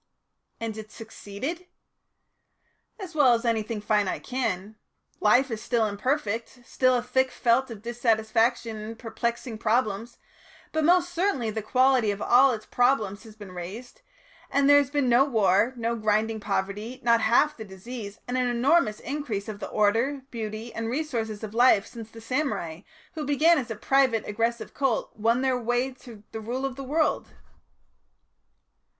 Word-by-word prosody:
"And 225 Hz, -2 st, -4 dB
it 215 Hz, -, -8 dB
has -, -, -20 dB
succeeded?" 230 Hz, -, -7 dB, 1.3 s
"As 375 Hz, -4 st, -8 dB
well 275 Hz, -6 st, +5 dB
as 230 Hz, +1 st, -4 dB
anything 225 Hz, -1 st, -1 dB
finite 210 Hz, -2 st, 0 dB
can. 220 Hz, -5 st, -3 dB, 0.4 s
Life 250 Hz, +5 st, +4 dB
is 220 Hz, -1 st, -4 dB
still 235 Hz, -2 st, +1 dB
imperfect, 230 Hz, +2 st, -2 dB
still 255 Hz, +1 st, +2 dB
a 240 Hz, -, 0 dB
thick 260 Hz, +1 st, +1 dB
felt 250 Hz, +2 st, +1 dB
of 220 Hz, -3 st, -9 dB
dissatisfactions 230 Hz, -1 st, 0 dB
and 220 Hz, +1 st, -7 dB
perplexing 235 Hz, 0 st, -4 dB
problems, 225 Hz, 0 st, 0 dB, 0.5 s
but 315 Hz, 0 st, 0 dB
most 350 Hz, +2 st, +3 dB
certainly 340 Hz, -, 0 dB
the 220 Hz, +1 st, -3 dB
quality 255 Hz, 0 st, +3 dB
of 200 Hz, 0 st, -2 dB
all 255 Hz, +5 st, +5 dB
its 215 Hz, -3 st, -5 dB
problems 230 Hz, -5 st, +1 dB
has 220 Hz, -1 st, -13 dB
been 205 Hz, -3 st, -11 dB
raised, 200 Hz, -, -8 dB, 0.5 s
and 280 Hz, 0 st, +2 dB
there 285 Hz, 0 st, +8 dB
has 280 Hz, -3 st, 0 dB
been 285 Hz, -2 st, 0 dB
no 245 Hz, +2 st, +5 dB
war, 220 Hz, -4 st, +2 dB
no 235 Hz, 0 st, -1 dB
grinding 215 Hz, 0 st, 0 dB
poverty, 205 Hz, +4 st, -3 dB
not 230 Hz, -1 st, +4 dB
half 290 Hz, +7 st, +3 dB
the 220 Hz, -, -8 dB
disease, 205 Hz, +2 st, -8 dB
and 250 Hz, +1 st, -1 dB
an 250 Hz, -, +1 dB
enormous 240 Hz, -1 st, +2 dB
increase 250 Hz, -8 st, -4 dB
of 210 Hz, -2 st, -6 dB
the -, -, -6 dB
order, 230 Hz, +7 st, +1 dB
beauty, 220 Hz, 0 st, -5 dB
and 225 Hz, 0 st, -3 dB
resources 235 Hz, -6 st, -3 dB
of 215 Hz, -1 st, -6 dB
life 235 Hz, -4 st, +5 dB
since 225 Hz, -2 st, -10 dB
the 225 Hz, 0 st, -12 dB
samurai, 230 Hz, -, -2 dB, 0.3 s
who 315 Hz, -, -4 dB
began 300 Hz, +3 st, +4 dB
as 245 Hz, -, -6 dB
a 225 Hz, -, -3 dB
private 255 Hz, 0 st, +2 dB
aggressive 230 Hz, +3 st, -2 dB
cult, 270 Hz, -5 st, -1 dB
won 230 Hz, +4 st, +1 dB
their 260 Hz, -2 st, +1 dB
way 245 Hz, +2 st, 0 dB
to 235 Hz, -4 st, -14 dB
the 220 Hz, -, -6 dB
rule 250 Hz, +5 st, -3 dB
of 270 Hz, -2 st, -3 dB
the 275 Hz, -, -7 dB
world." 305 Hz, +4 st, -1 dB
235 Hz, 165 wpm, -26 LUFS, 215-260 Hz, 1.3 s, there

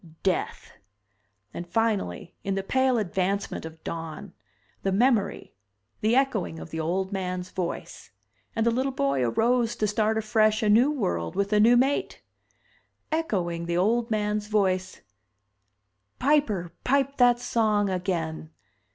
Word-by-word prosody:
Death. 190 Hz, -2 st, -1 dB, 0.8 s
And 175 Hz, -, -6 dB
finally, 205 Hz, -, -1 dB
in 195 Hz, 0 st, -1 dB
the 195 Hz, -, -2 dB
pale 260 Hz, +4 st, +2 dB
advancement 195 Hz, -2 st, -1 dB
of 160 Hz, 0 st, -10 dB
dawn, 165 Hz, -2 st, -6 dB, 0.5 s
the 195 Hz, -, 0 dB
memory, 215 Hz, 0 st, +1 dB, 0.5 s
the 220 Hz, +3 st, +2 dB
echoing 240 Hz, -11 st, +1 dB
of 160 Hz, -, -9 dB
the 160 Hz, -, -4 dB
old 185 Hz, +4 st, -1 dB
man's 185 Hz, -2 st, -3 dB
voice. 175 Hz, -2 st, -5 dB, 0.5 s
And 225 Hz, -, +1 dB
the 235 Hz, -, +4 dB
little 260 Hz, +3 st, 0 dB
boy 140 Hz, -, 0 dB
arose 230 Hz, -, +1 dB
to 215 Hz, -, 0 dB
start 215 Hz, +1 st, +1 dB
afresh 215 Hz, 0 st, +2 dB
a 210 Hz, -, +2 dB
new 235 Hz, +7 st, +5 dB
world 85 Hz, -, -2 dB
with 200 Hz, +1 st, 0 dB
a 210 Hz, -, +4 dB
new 235 Hz, +3 st, +6 dB
mate. 270 Hz, +3 st, 0 dB, 0.9 s
Echoing, 175 Hz, -, -1 dB
the 170 Hz, 0 st, 0 dB
old 230 Hz, +6 st, +2 dB
man's 210 Hz, -1 st, -1 dB
voice: 185 Hz, -3 st, 0 dB, 1.2 s
"Piper, 240 Hz, -, +1 dB
pipe 275 Hz, +1 st, +1 dB
that 245 Hz, -1 st, +5 dB
song 220 Hz, -4 st, +1 dB
again! 170 Hz, -4 st, -3 dB
210 Hz, 135 wpm, -26 LUFS, 180-235 Hz, 1.2 s, new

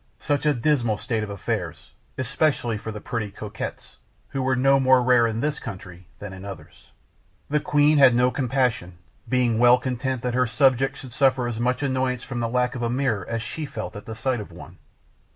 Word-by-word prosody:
Such 145 Hz, 0 st, -1 dB
a 150 Hz, -, +4 dB
dismal 120 Hz, -5 st, +1 dB
state 115 Hz, 0 st, -2 dB
of 105 Hz, -, -4 dB
affairs, 100 Hz, -2 st, -4 dB, 0.3 s
especially 130 Hz, -2 st, 0 dB
for 110 Hz, +1 st, -6 dB
the 105 Hz, -, -7 dB
pretty 110 Hz, -1 st, -4 dB
coquettes, 105 Hz, +1 st, -7 dB, 0.3 s
who 135 Hz, -, -3 dB
were 130 Hz, 0 st, +1 dB
no 135 Hz, +2 st, +4 dB
more 130 Hz, -1 st, +4 dB
rare 120 Hz, -2 st, +4 dB
in 115 Hz, 0 st, -3 dB
this 150 Hz, +1 st, -1 dB
country 95 Hz, -5 st, -9 dB
than 100 Hz, 0 st, -8 dB
in 95 Hz, 0 st, -10 dB
others. 85 Hz, -4 st, -11 dB, 0.6 s
The 150 Hz, -, +3 dB
queen 150 Hz, 0 st, +3 dB
had 130 Hz, -3 st, +7 dB
no 125 Hz, +1 st, +3 dB
compassion, 125 Hz, -10 st, -1 dB, 0.3 s
being 125 Hz, -3 st, +2 dB
well 120 Hz, +1 st, +7 dB
content 130 Hz, 0 st, -3 dB
that 125 Hz, -1 st, -1 dB
her 125 Hz, 0 st, +2 dB
subjects 135 Hz, +1 st, +2 dB
should 130 Hz, -3 st, -10 dB
suffer 130 Hz, -3 st, +2 dB
as 115 Hz, -2 st, -4 dB
much 125 Hz, +4 st, 0 dB
annoyance 130 Hz, -2 st, -1 dB
from 120 Hz, -2 st, -5 dB
the 115 Hz, -1 st, -1 dB
lack 125 Hz, +1 st, 0 dB
of 125 Hz, -, -5 dB
a 120 Hz, -, 0 dB
mirror 120 Hz, -6 st, -1 dB
as 115 Hz, -1 st, -2 dB
she 155 Hz, +5 st, -5 dB
felt 110 Hz, -5 st, -6 dB
at 105 Hz, -, -9 dB
the 110 Hz, -, -6 dB
sight 125 Hz, +2 st, -1 dB
of 105 Hz, -, -8 dB
one. -, -, -12 dB
125 Hz, 205 wpm, -24 LUFS, 110-130 Hz, 0.6 s, had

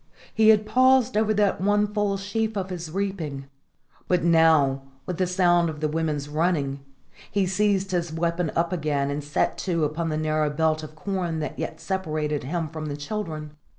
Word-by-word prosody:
He 220 Hz, -1 st, +5 dB
had 215 Hz, -1 st, +5 dB
paused 255 Hz, +1 st, +4 dB
over 215 Hz, 0 st, +2 dB
that 205 Hz, -3 st, +2 dB
one 205 Hz, +1 st, +3 dB
full 205 Hz, -1 st, -1 dB
sheaf 215 Hz, +2 st, -2 dB
of 190 Hz, -1 st, -3 dB
his 170 Hz, -2 st, -5 dB
reaping; 165 Hz, -7 st, -3 dB, 0.6 s
but 180 Hz, -2 st, +2 dB
now, 160 Hz, -5 st, +4 dB, 0.2 s
with 180 Hz, -, -4 dB
the 185 Hz, -, +2 dB
sound 175 Hz, -2 st, +3 dB
of 155 Hz, -1 st, -6 dB
the 155 Hz, -, 0 dB
women's 150 Hz, -2 st, -2 dB
running, 145 Hz, -3 st, 0 dB, 0.5 s
he 200 Hz, -2 st, +1 dB
seized 195 Hz, +1 st, +1 dB
his 170 Hz, -2 st, -1 dB
weapon 170 Hz, 0 st, -1 dB
again 155 Hz, -5 st, 0 dB
and 145 Hz, +1 st, -3 dB
set 145 Hz, 0 st, -1 dB
to 170 Hz, -4 st, 0 dB
upon 160 Hz, +2 st, -1 dB
the 155 Hz, -, -1 dB
narrow 155 Hz, -1 st, +1 dB
belt 155 Hz, +1 st, +1 dB
of 155 Hz, 0 st, -10 dB
corn 180 Hz, -1 st, -2 dB
that 150 Hz, -, -5 dB
yet -, -, -4 dB
separated 155 Hz, -7 st, -2 dB
him 165 Hz, +3 st, -2 dB
from 155 Hz, 0 st, -6 dB
the 145 Hz, -1 st, -4 dB
children. 155 Hz, -2 st, -5 dB
170 Hz, 180 wpm, -25 LUFS, 155-195 Hz, 0.6 s, He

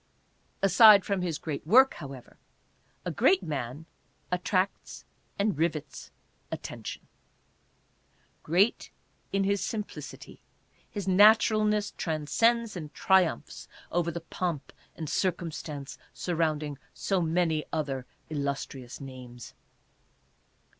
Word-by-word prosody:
Aside 205 Hz, 0 st, +8 dB
from 200 Hz, -2 st, -1 dB
his 170 Hz, -4 st, -2 dB
great 155 Hz, -2 st, -5 dB
work, 260 Hz, +8 st, +7 dB
however, 135 Hz, -5 st, -10 dB, 0.7 s
a -, -, -1 dB
great 190 Hz, 0 st, +3 dB
man 145 Hz, -1 st, -4 dB, 0.5 s
attracts 185 Hz, +2 st, -1 dB, 0.3 s
and 200 Hz, -1 st, +1 dB
rivets 155 Hz, -3 st, -2 dB, 0.4 s
attention. -, -, -7 dB, 1.3 s
Great 185 Hz, +8 st, +2 dB, 0.4 s
in 195 Hz, 0 st, +1 dB
his 200 Hz, 0 st, +1 dB
simplicity, 210 Hz, -2 st, -6 dB, 0.5 s
his 200 Hz, -3 st, -5 dB
naturalness 210 Hz, +1 st, +5 dB
transcends 220 Hz, +9 st, +1 dB
and 155 Hz, -4 st, -6 dB
triumphs 185 Hz, -, +1 dB, 0.2 s
over 170 Hz, 0 st, +1 dB
the 170 Hz, 0 st, -5 dB
pomp 165 Hz, -3 st, -4 dB, 0.2 s
and 160 Hz, -, -5 dB
cir 185 Hz, +5 st, +2 dB
cumstance 150 Hz, -4 st, -7 dB, 0.2 s
surrounding 155 Hz, -4 st, -1 dB, 0.2 s
so 195 Hz, -2 st, 0 dB
many 165 Hz, -2 st, +1 dB
other 140 Hz, -5 st, -2 dB, 0.2 s
illustrious 140 Hz, -4 st, -4 dB
names. 125 Hz, -3 st, -10 dB
170 Hz, 100 wpm, -28 LUFS, 150-195 Hz, 1.3 s, Aside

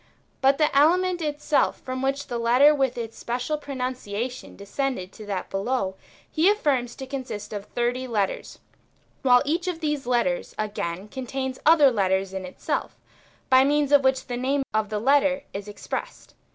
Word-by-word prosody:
But 270 Hz, +1 st, +4 dB
the 300 Hz, -3 st, +2 dB
element 350 Hz, +5 st, +4 dB
itself 300 Hz, -1 st, 0 dB
from 255 Hz, 0 st, -4 dB
which 275 Hz, +1 st, -1 dB
the 240 Hz, -, -4 dB
letter 250 Hz, +6 st, +5 dB
with 270 Hz, -4 st, 0 dB
its 230 Hz, -1 st, -6 dB
special 250 Hz, +5 st, -2 dB
pronunciation 255 Hz, -4 st, -4 dB
descended 200 Hz, -1 st, -3 dB
to 215 Hz, -, -11 dB
that 195 Hz, -3 st, -4 dB
below, 195 Hz, -1 st, -1 dB, 0.3 s
he 330 Hz, +4 st, +3 dB
affirms 275 Hz, -, +1 dB
to 265 Hz, -, -7 dB
consist 255 Hz, -6 st, -6 dB
of 205 Hz, -1 st, -5 dB
thirty 245 Hz, +3 st, -2 dB
letters, 210 Hz, -5 st, -2 dB, 0.6 s
while 250 Hz, -2 st, +5 dB
each 335 Hz, +5 st, -1 dB
of 355 Hz, -3 st, -2 dB
these 295 Hz, -5 st, -2 dB
letters, 235 Hz, -8 st, 0 dB
again, 200 Hz, -3 st, -3 dB
contains 260 Hz, +2 st, -4 dB
other 305 Hz, -4 st, +7 dB
letters 190 Hz, -3 st, 0 dB
in 190 Hz, -1 st, -4 dB
itself, 185 Hz, -, -3 dB, 0.5 s
by 260 Hz, 0 st, +6 dB
means 290 Hz, 0 st, +2 dB
of 285 Hz, -1 st, +6 dB
which 265 Hz, 0 st, +2 dB
the 245 Hz, -1 st, -4 dB
name 270 Hz, +3 st, 0 dB
of 215 Hz, -1 st, 0 dB
the 210 Hz, -, -2 dB
letter 275 Hz, +3 st, +3 dB
is 200 Hz, +1 st, -6 dB
expressed. 205 Hz, 0 st, -6 dB
255 Hz, 165 wpm, -25 LUFS, 215-280 Hz, 0.6 s, other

